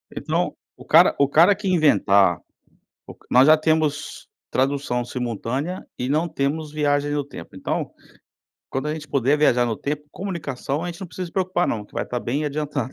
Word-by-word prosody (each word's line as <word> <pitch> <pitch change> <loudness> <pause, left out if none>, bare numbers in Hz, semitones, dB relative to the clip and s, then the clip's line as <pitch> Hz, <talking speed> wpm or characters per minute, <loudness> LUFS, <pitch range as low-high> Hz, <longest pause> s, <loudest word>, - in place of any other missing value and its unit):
Então - - -1 0.2
o - - -14
cara - - +6
o 140 - +4
cara 170 +8 +5
que 205 -1 -5
inventar 100 - +4 0.7
o - - -11
nós 130 +2 +6
já 155 +1 +8
temos 155 -1 -1 0.2
tradução 135 -2 0
simultânea 125 - -4
e 125 - -2
não 155 +5 +1
temos 150 +1 -2
viagem 145 -1 +1
no 145 -1 -1
tempo, 110 -12 -11
então - - -3 0.8
quando 135 +3 -3
a - - -1
gente 155 -1 -8
puder 140 +2 +2
viajar 125 -5 +4
no 115 -2 -2
tempo, 150 +4 -4
comunicação, 155 -7 -4
a - - -3
gente 175 0 -7
não 190 - -5
precisa 180 +2 -6
se 165 - -13
preocupar, 185 -2 0
não 105 -2 -2
que - - -22
vai - - -1
estar 125 - -4
bem 140 +7 -2
adiantado. 145 -3 -3
145 Hz, 185 wpm, -23 LUFS, 130-160 Hz, 0.8 s, já